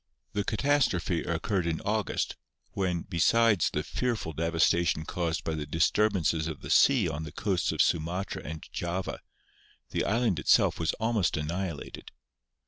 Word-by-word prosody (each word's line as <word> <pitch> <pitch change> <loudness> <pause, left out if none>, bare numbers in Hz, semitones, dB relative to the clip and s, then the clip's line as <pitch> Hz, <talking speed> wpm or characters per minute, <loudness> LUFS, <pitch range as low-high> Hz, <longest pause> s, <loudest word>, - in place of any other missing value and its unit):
The 105 0 0
catastro 140 -2 +2
phe 85 -1 -2
occurred 85 +2 -1
in 80 -1 -1
August, 105 0 -1 0.4
when, 90 -3 -1
besides 105 +3 +3
the - - -2
fearful 115 -10 -2
de 80 +3 -1
vastation 85 -1 +2
caused 85 -2 -2
by 80 - -2
the 75 -2 -4
disturbances 80 0 +1
of 80 -3 -6
the - - -6
sea 130 -9 +5
on 80 -1 -3
the 80 -2 -7
coasts 90 +1 0
of - - +3
Sumatra 85 +4 -1
and 75 +1 -7
Java, 90 +2 -3 0.7
the - - 0
island 110 -6 +1
itself - - +3
was 80 - 0
almost 110 -7 0
annihilated. 85 +1 -4
85 Hz, 150 wpm, -28 LUFS, 80-105 Hz, 0.7 s, sea